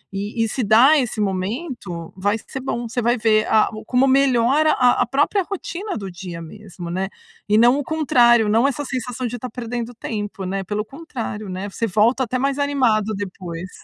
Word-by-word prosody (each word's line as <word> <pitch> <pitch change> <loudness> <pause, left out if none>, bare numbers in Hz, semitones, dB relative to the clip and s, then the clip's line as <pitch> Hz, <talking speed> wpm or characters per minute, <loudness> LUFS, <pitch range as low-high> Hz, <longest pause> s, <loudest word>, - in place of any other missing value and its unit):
E 210 +3 -2
e - - +1
se 250 +3 -2
dar 240 +9 +6
esse 240 -4 -2
momento, 195 - -4
vai 205 +3 0
ser 265 - -5
bom. 240 -2 -3
Você 245 +2 -2
vai 240 +2 +2
ver, 215 -1 +3
a 220 -1 +4
o 215 - -7
como 250 +4 +2
melhora 270 +3 +3
a 250 -1 +3
a 250 - +3
própria 290 - +1
rotina 390 - -5
do 195 -2 -6
dia 175 -2 -7
mesmo, 180 0 -9
né. 190 +3 -2 0.4
E 210 - +4
não 240 +4 +5
o 290 - -2
contrário, 240 -7 +4
não 230 +5 +4
essa 280 +1 -3
sensação 255 -1 -4
de 240 - -5
estar 250 +1 -6
perdendo 240 0 -5
tempo, 205 -4 -5
né, 195 +1 -2
pelo 210 +3 -3
contrário, 230 - -6
né, 190 +2 -5
você 230 - -2
volta 225 +6 +2
até 255 +2 -2
mais 275 +1 0
animado 240 -7 +1
depois. 185 -3 -6
230 Hz, 195 wpm, -21 LUFS, 205-260 Hz, 0.4 s, dar